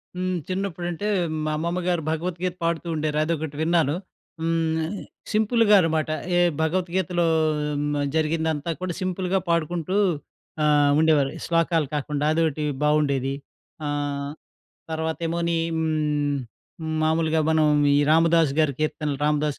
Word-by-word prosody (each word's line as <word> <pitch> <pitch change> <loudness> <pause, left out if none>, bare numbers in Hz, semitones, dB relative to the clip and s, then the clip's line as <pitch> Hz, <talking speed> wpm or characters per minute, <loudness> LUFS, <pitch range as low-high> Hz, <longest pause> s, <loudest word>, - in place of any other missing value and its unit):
హ్మ్. 185 0 -1
చిన్నప్పుడంటే 185 0 -3 0.4
మా 155 - 0
అమ్మమ్మ 170 +3 -1
గారు 175 -2 +1
భగవత్ 170 +2 -3
గీత 180 -1 -1
పాడుతూ 165 0 -1
ఉండేవారు 155 -1 -1
అదొకటి 160 -2 -2
విన్నాను. 160 -3 +2 0.5
హ్మ్. 165 -1 0 0.5
సింపుల్‌గా 220 0 +4
అనమాట. 160 -2 0 0.3
ఏ - - +4 0.2
భగవత్ 175 +3 0
గీతలో 175 -2 +1 0.6
మ్ 145 - -1 0.2
జరిగిందంతా 160 0 0
కూడా 185 -1 -2
సింపుల్‌గా 185 +1 0
పాడుకుంటూ 170 +2 0 0.7
ఆహ్, 145 -1 +4
ఉండేవాళ్ళు. 150 -4 +3
శ్లోకాలు 165 -3 +1
కాకుండా 145 0 -2
అదొటి 155 -2 0 0.2
బాగుండేది. 140 -3 +2 0.5
ఆహ్, 145 -1 -2 0.6
తర్వాత 160 -1 -2
ఏమోని 170 0 0 0.2
హ్మ్ 150 -1 -2
మామూలుగా 160 0 +2
మనం 160 -1 +3 0.3
ఈ - - +4
రామదాసు 165 -2 +4
గారి 155 -3 +3
కీర్తనలు 150 -1 -1
రామదాసు 150 -1 +1
160 Hz, 120 wpm, -24 LUFS, 150-170 Hz, 0.7 s, సింపుల్‌గా